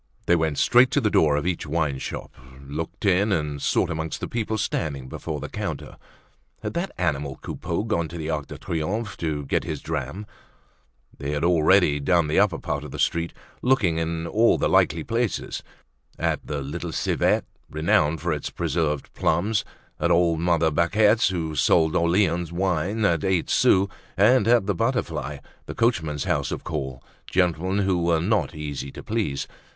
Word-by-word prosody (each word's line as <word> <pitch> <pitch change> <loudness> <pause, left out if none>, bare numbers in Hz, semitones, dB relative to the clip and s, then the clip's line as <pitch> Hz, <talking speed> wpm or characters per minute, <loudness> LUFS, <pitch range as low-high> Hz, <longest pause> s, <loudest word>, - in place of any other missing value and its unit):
They 85 - +4
went 80 -3 0
straight 125 +1 +5
to - - +4
the 110 -6 +1
door 75 -2 +4
of 75 - -1
each 90 -3 -2
wineshop, 75 -3 -2 0.3
looked 80 +8 -6
in 100 +2 +3
and 75 -5 -1
sought - - +1
amongst 80 0 -3
the - - -4
people 110 -2 -2
standing 70 -9 -2
before 75 +3 -5
the 75 - -5
counter. - - -5 0.7
Had - - -3
that 175 +3 -2
animal 75 -5 -1
Coupeau 85 +3 -3
gone 95 -7 -1
to 85 - -8
the 80 -2 -4
Arc 75 -3 -2
de - - -8
Triomphe 100 +7 -3
to 75 -3 -2
get - - 0
his - - -4
dram? 105 +4 -4 0.9
They 70 - -5
had 75 - -2
already 85 -2 +4
done 85 +3 +2
the 75 - +2
upper 100 -5 +3
part - - -3
of - - -8
the - - -7
street, 85 0 0 0.3
looking 110 -11 +2
in 80 0 -2
at - - -5
all 115 +2 +4
the - - +1
likely 80 0 +3
places; 115 +1 -2 0.6
at - - -1
the 75 -2 -3
"Little 80 +5 -5
Civet," - - +1 0.2
renowned 80 0 +1
for 85 -1 0
its 75 - -4
preserved 80 -3 -2
plums; 105 +6 +1 0.4
at - - +1
old 85 -2 +3
mother 85 -2 +2
Baquet's, 105 +8 +3
who 85 -4 -2
sold 80 +2 +3
Orleans 85 -1 +2
wine 95 +4 0
at 85 -4 +2
eight 95 -3 +1
sous; 95 +1 +4 0.3
at 115 +7 +5 0.2
the 105 - +1
"Butterfly," 80 - -1 0.3
the - - -6
coachmen's 80 - 0
house - - 0
of - - -4
call, 65 -4 -4 0.2
gentlemen 95 +2 +1
who 90 -2 +1
were 85 -1 +2
not 100 0 0
easy 70 -3 -5
to - - -9
please. 105 -12 -2
85 Hz, 175 wpm, -24 LUFS, 75-95 Hz, 0.9 s, straight